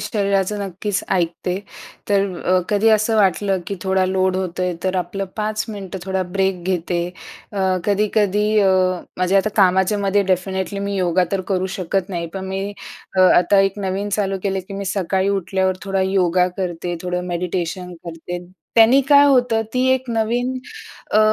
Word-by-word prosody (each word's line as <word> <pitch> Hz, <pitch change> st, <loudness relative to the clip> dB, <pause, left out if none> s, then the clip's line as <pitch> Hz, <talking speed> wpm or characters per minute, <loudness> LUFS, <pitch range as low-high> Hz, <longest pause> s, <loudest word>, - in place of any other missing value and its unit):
शरीराचं 200 Hz, -1 st, 0 dB
नक्कीच 195 Hz, +1 st, -3 dB
ऐकते. 180 Hz, +1 st, -1 dB, 0.5 s
तर 200 Hz, -1 st, +3 dB, 0.2 s
अ, 185 Hz, 0 st, +3 dB
कधी 210 Hz, +2 st, +3 dB
असं 220 Hz, +1 st, +3 dB
वाटलं 195 Hz, -1 st, +2 dB
की 200 Hz, -, -4 dB
थोडा 190 Hz, 0 st, +2 dB
लोड 185 Hz, 0 st, +1 dB
होत 185 Hz, -1 st, -3 dB
आहे 180 Hz, -1 st, 0 dB
तर 185 Hz, 0 st, 0 dB
आपलं 180 Hz, +2 st, -2 dB
5 215 Hz, 0 st, -1 dB
मिनिटं 195 Hz, -3 st, -6 dB
थोडा 190 Hz, 0 st, 0 dB
ब्रेक 190 Hz, -2 st, 0 dB
घेते. 175 Hz, -1 st, -1 dB, 0.5 s
अ, 200 Hz, -, -4 dB, 0.3 s
कधी-कधी 210 Hz, 0 st, +1 dB, 0.2 s
अ, 195 Hz, -, +4 dB, 0.5 s
म्हणजे 185 Hz, +2 st, +2 dB
आता 205 Hz, +2 st, +2 dB
कामाच्यामध्ये 195 Hz, +1 st, +3 dB
डेफिनेटली 190 Hz, +2 st, -2 dB
मी 200 Hz, 0 st, -2 dB
योगा 180 Hz, 0 st, +2 dB
तर 195 Hz, -, +1 dB
करू 185 Hz, 0 st, 0 dB
शकत 190 Hz, +1 st, -1 dB
नाही 170 Hz, -2 st, -3 dB
पण 190 Hz, 0 st, -4 dB
मी 195 Hz, +1 st, -3 dB, 0.5 s
अ, 185 Hz, -, +4 dB
आता 185 Hz, +1 st, +5 dB
एक 195 Hz, +1 st, 0 dB
नवीन 195 Hz, +2 st, -2 dB
चालू 195 Hz, -2 st, -1 dB
केलं, 195 Hz, -1 st, -1 dB
की 195 Hz, -, -7 dB
मी 200 Hz, 0 st, -4 dB
सकाळी 190 Hz, 0 st, 0 dB
उठल्यावर 190 Hz, -1 st, 0 dB
थोडा 195 Hz, -1 st, -1 dB
योगा 185 Hz, -1 st, +2 dB
करते, 175 Hz, -2 st, -3 dB
थोडं 180 Hz, 0 st, -3 dB
मेडिटेशन 180 Hz, 0 st, -3 dB
करते. 175 Hz, +1 st, -6 dB, 0.3 s
त्यांनी 230 Hz, +4 st, +6 dB
काय 285 Hz, 0 st, +7 dB
होतं 245 Hz, -5 st, +3 dB
ती 255 Hz, +1 st, +2 dB
एक 260 Hz, -2 st, -4 dB
नवीन 240 Hz, +3 st, 0 dB, 0.5 s
अ, 215 Hz, -, +5 dB
190 Hz, 165 wpm, -20 LUFS, 185-205 Hz, 0.5 s, काय